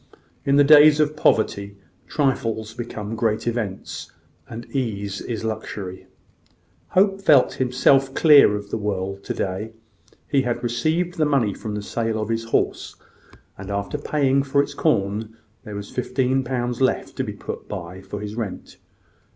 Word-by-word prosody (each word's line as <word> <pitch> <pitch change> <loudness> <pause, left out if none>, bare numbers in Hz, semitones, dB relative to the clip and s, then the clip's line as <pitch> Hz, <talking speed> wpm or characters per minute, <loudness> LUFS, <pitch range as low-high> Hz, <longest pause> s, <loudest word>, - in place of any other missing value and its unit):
In 140 - +3
the 145 - +6
days 150 +1 +7
of 150 0 +2
poverty, 100 -7 +1 0.3
trifles 115 -6 -1
become 110 -2 -6
great 110 -1 0
events, 115 -5 -4 0.4
and 115 +1 -7
ease 100 -6 -2
is 115 -2 -4
luxury. 105 -4 -5 0.9
Hope 195 0 +4
felt 145 -9 +5
himself 135 +1 +2
clear 145 -9 +7
of 105 0 -7
the - - -2
world 100 -1 -3
to - - -3
day. 100 +4 -3 0.5
He 140 - +2
had 125 -2 -2
received 160 +9 -1
the 155 - +4
money 135 -9 +2
from 105 +1 -6
the 105 - -4
sale 115 +1 -2
of 110 0 -3
his 115 0 -1
horse; 115 - -1 0.6
and 95 0 -8
after 100 -2 -3
paying 140 -2 +1
for 140 +1 +2
its 145 - -7
corn, 110 -6 -1 0.3
there 105 -2 -7
was 100 0 -7
fifteen 130 +1 0
pounds 125 -1 -2
left 130 - 0
to - - 0
be - - -5
put - - -7
by 90 +1 -7
for 95 +1 -7
his 105 0 -5
rent. 110 -4 -6
115 Hz, 160 wpm, -23 LUFS, 105-135 Hz, 0.9 s, days